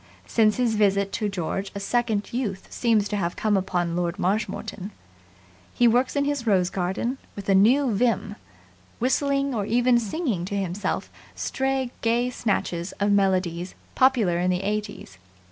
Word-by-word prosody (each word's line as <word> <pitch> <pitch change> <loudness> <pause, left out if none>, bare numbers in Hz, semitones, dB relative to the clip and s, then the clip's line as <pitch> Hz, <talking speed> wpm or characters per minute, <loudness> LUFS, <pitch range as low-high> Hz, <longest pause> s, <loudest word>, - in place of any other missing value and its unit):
Since 215 -2 +2
his 245 -3 +1
visit 200 -2 +2
to 210 -2 -1
George 195 +1 -3
a - - -3
second 215 -1 -1
youth 210 -7 -3
seems 220 -4 +2
to 210 - -2
have 175 -3 -2
come 215 -1 +1
upon 175 -3 -1
Lord 175 +1 -1
Marshmoreton. 200 0 -2 0.9
He 240 - +4
works 245 +4 +2
in 280 0 +1
his 285 -4 -2
rose 185 -4 +3
garden 195 +8 -2 0.2
with 200 -1 -8
a 195 - +4
new 240 +6 +4
vim, 210 -1 0 0.6
whistling 275 +2 +1
or 205 -4 -2
even 240 +1 +3
singing 230 - -2
to 200 - -4
himself 195 +1 -2 0.2
stray 265 -2 -1
gay 240 +2 +1
snatches 190 -6 -2
of 205 0 0
melodies 185 -3 +1 0.2
popular 235 -10 +3
in 180 +1 +1
the 180 +1 0
'eighties. 205 - -4
210 Hz, 155 wpm, -25 LUFS, 190-240 Hz, 0.9 s, He